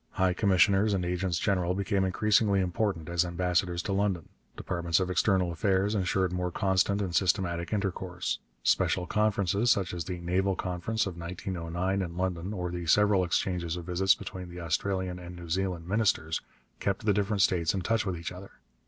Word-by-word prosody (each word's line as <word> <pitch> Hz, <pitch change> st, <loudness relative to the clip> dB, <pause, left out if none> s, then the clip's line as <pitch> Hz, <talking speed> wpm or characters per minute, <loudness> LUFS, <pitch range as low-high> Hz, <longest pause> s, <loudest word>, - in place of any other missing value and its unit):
High 95 Hz, -1 st, +2 dB
commissioners 100 Hz, +2 st, +3 dB
and 90 Hz, -2 st, -1 dB
agents 90 Hz, -1 st, -1 dB
general 90 Hz, -1 st, +1 dB
became 100 Hz, 0 st, 0 dB
increasingly 100 Hz, +1 st, +3 dB
important 90 Hz, -2 st, -1 dB
as 85 Hz, 0 st, +2 dB
ambassadors 90 Hz, 0 st, 0 dB
to 100 Hz, -, -2 dB
London. 95 Hz, -4 st, 0 dB, 0.3 s
Departments 85 Hz, -1 st, 0 dB
of 90 Hz, -1 st, -1 dB
External 90 Hz, 0 st, +2 dB
Affairs 95 Hz, +4 st, +1 dB
ensured 95 Hz, -2 st, 0 dB
more 90 Hz, 0 st, -1 dB
constant 95 Hz, +2 st, +1 dB
and 90 Hz, -3 st, -3 dB
systematic 85 Hz, -2 st, +1 dB
intercourse. 95 Hz, -4 st, -2 dB, 0.2 s
Special 90 Hz, -, +2 dB
conferences, 105 Hz, +1 st, +1 dB
such 100 Hz, -7 st, +2 dB
as 85 Hz, -2 st, -4 dB
the 90 Hz, -1 st, -4 dB
Naval 95 Hz, +3 st, 0 dB
Conference 90 Hz, +5 st, -2 dB
of 95 Hz, -3 st, -5 dB
1909 90 Hz, +2 st, -3 dB
in 85 Hz, -2 st, -5 dB
London, 90 Hz, 0 st, -2 dB
or 90 Hz, -4 st, -3 dB
the 85 Hz, -1 st, -5 dB
several 105 Hz, +1 st, +4 dB
exchanges 85 Hz, -1 st, -1 dB
of 85 Hz, -, -7 dB
visits 95 Hz, +2 st, +3 dB
between 90 Hz, -3 st, -7 dB
the 90 Hz, +1 st, -8 dB
Australian 90 Hz, +2 st, -1 dB
and 90 Hz, 0 st, -9 dB
the 85 Hz, -, -9 dB
New 85 Hz, -, -9 dB
Zealand 90 Hz, -2 st, -1 dB
ministers, 95 Hz, -6 st, +1 dB, 0.4 s
kept 100 Hz, +1 st, -2 dB
the 105 Hz, -, +4 dB
different 100 Hz, 0 st, +1 dB
states 85 Hz, -2 st, +2 dB
in 95 Hz, -, -1 dB
touch 115 Hz, +3 st, +1 dB
with 95 Hz, -3 st, -3 dB
each 85 Hz, -, -5 dB
other. 95 Hz, +2 st, -10 dB
90 Hz, 180 wpm, -29 LUFS, 85-100 Hz, 0.4 s, several